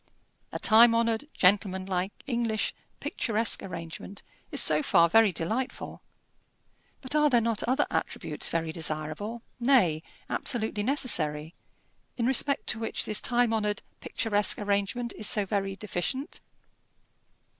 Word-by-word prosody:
A - - -4
time 230 +1 +6
honoured, 230 +2 +1
gentlemanlike, 190 -1 +1
English, 235 -4 -1 0.3
picturesque 225 -1 0
arrangement 170 +2 -8 0.3
is - - +1
so - - +5
far 175 - +4
very 220 +3 +5
delightful. 220 +10 -4 1.0
But 260 0 -3
are 300 0 +4
there 245 -3 +4
not 230 -2 -1
other 260 +4 +2
attributes - - -3
very 165 -1 -2
desirable 160 +8 -3 0.2
nay, 235 - +3 0.3
absolutely 220 -4 -3
necessary 165 - 0 0.6
in 235 - 0
respect 270 +2 +1
to 220 - +1
which 225 - -3
this 215 - 0
time 240 -2 +1
honoured, 210 -2 -1 0.2
picturesque 210 -2 +1
arrangement 205 +4 -1
is 215 - +1
so 205 -2 +3
very 195 0 -2
deficient? 215 - -3
215 Hz, 125 wpm, -28 LUFS, 185-235 Hz, 1.0 s, time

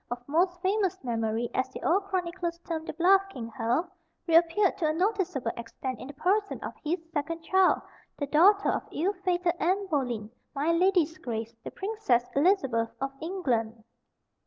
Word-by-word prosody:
of 245 - -2
Most 355 +4 +1
Famous 385 -1 +1
Memorye," 230 -1 -1
as 260 0 0
the - - -9
old 390 +4 +2
chronicles 350 -3 -2
term 320 -2 -3
the - - -5
"bluff 380 +3 +5
King 235 -11 -7
Hal," 245 +7 0 0.4
reappeared 340 +4 +4
to 320 - +2
a 305 - +1
noticeable 360 - 0
extent 240 +2 -6
in - - -8
the 285 - -8
person 400 +6 0
of - - -5
his 320 +3 0 0.2
second 330 +2 -3
child, 380 +2 +3 0.3
the 285 - -2
daughter 380 +8 +5
of - - -1
ill 370 +6 0
fated 355 -2 +1
Anne 380 +4 +1
Boleyn 240 -7 -1 0.2
"my 295 +4 +1
ladye's 340 -2 +2
grace" 230 -2 -4
the - - -5
Princess 385 - 0
Elizabeth 270 - +2
of 270 0 -2
England. 240 - -2
330 Hz, 165 wpm, -28 LUFS, 255-375 Hz, 0.4 s, bluff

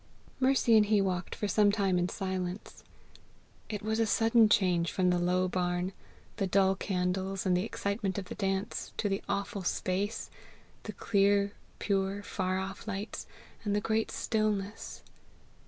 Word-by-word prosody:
Mercy 260 -3 +4
and 210 -1 +5
he 210 -1 +4
walked 185 -2 -1
for 210 - -2
some 205 0 +4
time 195 -3 +1
in 175 +1 0
silence. 185 -1 -4 0.9
It 210 -2 -4
was 220 +1 0
a 225 - +3
sudden 225 0 +4
change 180 -4 +3
from 180 -1 +2
the 175 - +2
low 180 +1 +2
barn, 180 +1 -1 0.4
the 195 - 0
dull 190 0 +4
candles, 190 0 -1
and 185 -1 +3
the 180 - +1
excitement 200 -2 -2
of 195 - -3
the - - -7
dance, 195 0 -2
to 210 - 0
the 195 0 -1
awful 200 +1 -2
space, 195 +5 -2 0.5
the - - -5
clear 200 -1 +2 0.3
pure 195 0 -1
far 185 -2 -1
off 195 +2 -5
lights, 205 0 -4 0.4
and 205 -2 0
the - - +3
great 220 +1 0
stillness. 210 -2 -2
195 Hz, 155 wpm, -30 LUFS, 185-210 Hz, 0.9 s, and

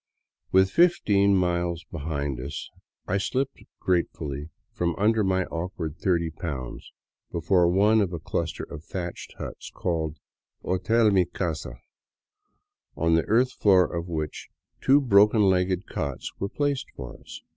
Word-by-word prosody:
With 95 0 +4
fifteen 100 - +4
miles 85 -2 0
behind 75 -5 -4
us 70 +3 -6 0.4
I 100 - +1
slipped 130 +7 -2 0.2
gratefully 75 -5 -1 0.2
from 85 -1 -1
under 110 +2 +2
my 95 -1 +1
awkward 85 -2 -4
thirty 85 -3 +1
pounds 70 -6 -6 0.4
before 85 +1 +3
one 105 +5 +4
of 95 -3 0
a 85 - -3
cluster 80 +1 -3
of 75 - -8
thatched 85 0 -6
huts - - -7
called 80 -3 -2 0.3
" - - -59
Hotel 105 +5 +2
Mi 95 -2 +4
Casa," 80 -8 -4 1.2
on 85 +1 +2
the 80 - +3
earth 125 +4 +3
floor 95 -3 +4
of 85 +1 -3
which 80 -3 -4 0.3
two 135 +2 +6
broken 105 -4 +5
legged 95 -1 +2
cots - - -4
were 100 - -2
placed 145 +1 -1
for 65 -3 -8
us. - - -11
90 Hz, 140 wpm, -26 LUFS, 80-100 Hz, 1.2 s, two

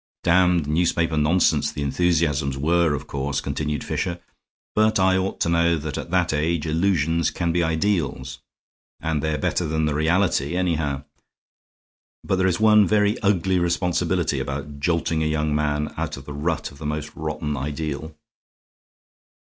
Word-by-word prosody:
"Damned 90 -2 +3
newspaper 80 +1 +1
nonsense 80 +4 +2
the 75 - -4
enthusiasms 75 -3 +1
were, 80 +1 +2
of 70 - -6
course," 70 0 -2
continued 75 +1 -3
Fisher, 90 -1 -3 0.5
"but 110 -1 +3
I 95 0 +4
ought 95 +1 -1
to - - +2
know 85 0 +3
that 75 -2 -5
at - - -5
that 90 -2 +1
age 80 +1 0
illusions 80 -1 +1
can 85 -2 -1
be 85 +1 +1
ideals. 80 -6 -1 0.6
And 80 -2 -1
they're 80 0 -1
better 80 +4 -1
than 80 0 0
the 75 - 0
reality, 80 -1 +1
anyhow. 80 -6 -1 1.2
But 95 - 0
there 95 0 +2
is 90 +1 0
one 105 -2 +5
very 105 +2 +2
ugly 95 -3 +1
responsibility 85 0 0
about 70 +1 -5
jolting 80 +1 0
a 80 - +1
young 75 -1 0
man 75 0 -1
out - - -3
of 70 - -11
the 75 - -7
rut 75 +3 -2
of 70 - -15
the 75 - -4
most 75 0 -4
rotten 75 -1 -3
ideal." 75 +2 -4
80 Hz, 155 wpm, -23 LUFS, 75-90 Hz, 1.2 s, one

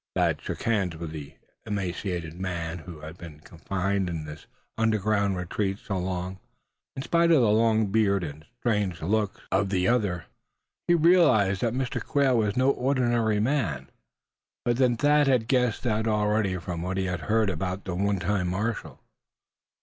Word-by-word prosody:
Thad - - +1
shook - - -5
hands 100 -7 0
with 80 -1 -6
the 75 -3 -8 0.3
emaciated 90 -4 -3
man 85 -2 -4
who 80 -2 -10
had 80 +3 -9
been 80 -3 -10
confined 95 +4 -2
in 80 -3 -4
this 75 0 -10 0.3
underground 110 -3 +1
retreat 95 +2 -2
so 100 - -5
long. 90 +1 -3 0.6
In 135 - -4
spite 170 +2 +3
of 155 -7 +5
the 105 - +4
long 110 -1 +3
beard 100 -3 +2
and 75 -1 -7
strange 105 -7 0
looks 105 +3 0
of 95 +1 +2
the 95 -2 +1
other, 100 -8 +1 0.6
he 175 - +5
realized 150 - +4
that 120 -1 0
Mr. 130 -1 -2
Quail 140 -4 +2
was 105 -2 +1
no 130 +2 +4
ordinary 120 -5 +1
man. 100 - -1 0.7
But 120 -1 +1
then 125 -3 +3
Thad 145 +2 +4
had 125 -4 +2
guessed 125 -3 +1
that 110 -2 0
already, 105 -3 +1
from 85 -1 -5
what 95 +2 -3
he 95 - 0
had 90 -1 -2
heard 110 +3 +1
about 95 +3 -4
the 95 - -3
one 100 +2 0
time 95 0 0
marshal. 105 +5 -3
100 Hz, 165 wpm, -26 LUFS, 90-115 Hz, 0.7 s, of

